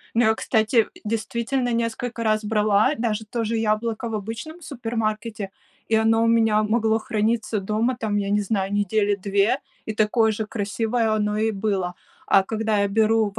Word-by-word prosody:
Но, 220 -1 +4
кстати, 220 +1 0
э, 225 - +6 0.2
действительно, 235 +3 -1
несколько 230 0 -2
раз 215 0 +1
брала 210 +4 +3
даже 220 -2 -1
то 230 +2 -3
же 225 +1 -1
яблоко 225 +2 -1
в 225 - -5
обычном 230 - -6
супермаркете, 225 -5 -3 0.4
и 225 - +1
оно 225 +1 +3
у - - +3
меня 225 -2 +3
могло 220 0 +2
храниться 220 -2 -1
дома, 215 +6 0
там, 215 -3 -1
я 200 -1 -1
не 205 +1 +2
знаю, 195 -1 -1
недели 205 0 +1
2, 200 +5 +1 0.3
и 220 - -3
такое 220 +1 +2
же 215 0 -3
красивое 220 +2 -1
оно 210 -1 0
и 220 +1 +2
было. 195 -4 -2 0.3
А 195 - +5
когда 220 +1 -1
я 200 - +2
беру 220 0 +2
в - - -6
220 Hz, 175 wpm, -23 LUFS, 210-230 Hz, 0.4 s, э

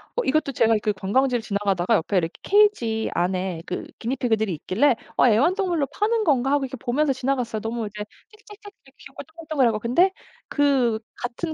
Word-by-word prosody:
어 - - 0
이것도 295 +1 +1
제가 225 -3 +3
그 210 - +1
관광지를 245 +6 0
지나가다가 200 -1 0
옆에 190 +2 0
이렇게 165 -2 0
케이지 385 - +2
안에 180 -1 -1
그 180 - -5
기니피그들이 225 -4 -1
있길래 225 - +1 0.2
'어 - - +5
애완동물로 335 - +2
파는 435 - 0
건가?' 270 -5 +2
하고 285 -1 +2
이렇게 265 0 -7
보면서 270 +5 0
지나갔어요. 250 -4 -2
너무 225 -1 -3
이제 210 0 -6 0.3
짹짹짹 420 -1 -15
되게 270 +1 -21
귀엽고 270 +1 -11
동글동글하고 295 -8 -1
근데 340 - +3 0.4
그 265 -6 +2 0.2
같은 280 +7 -4
250 Hz, 425 characters per minute, -23 LUFS, 220-300 Hz, 0.4 s, 어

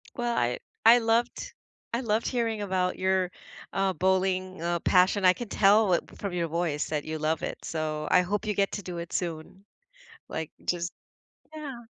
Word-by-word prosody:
Well, 240 -1 -1
I 120 +1 +1 0.3
I 230 +2 +9
loved 230 +1 0 0.4
I 235 - +1
loved 225 -2 0
hearing 230 -4 -1
about 185 -2 0
your, 190 -1 +1 0.4
uh, 195 -1 +1
bowling, 185 +1 0
uh, 170 0 0
passion. 185 +3 +3
I 185 - +7
can 240 +2 -6
tell 205 -1 +4
it 170 - +2
from 200 -3 -4
your 170 -2 0
voice 160 -2 -1
that 150 -2 -2
you 155 0 -4
love 155 +1 0
it, - - -4
so 155 -1 -3
I 180 - +6
hope 205 +4 -2
you 210 - 0
get 195 -1 +1
to 205 - -3
do 180 -3 -6
it 170 0 -6
soon, 170 +2 -4 0.7
like, 160 -1 -4
just 175 0 -1 0.6
yeah. 270 -6 -7
185 Hz, 180 wpm, -28 LUFS, 170-210 Hz, 0.7 s, I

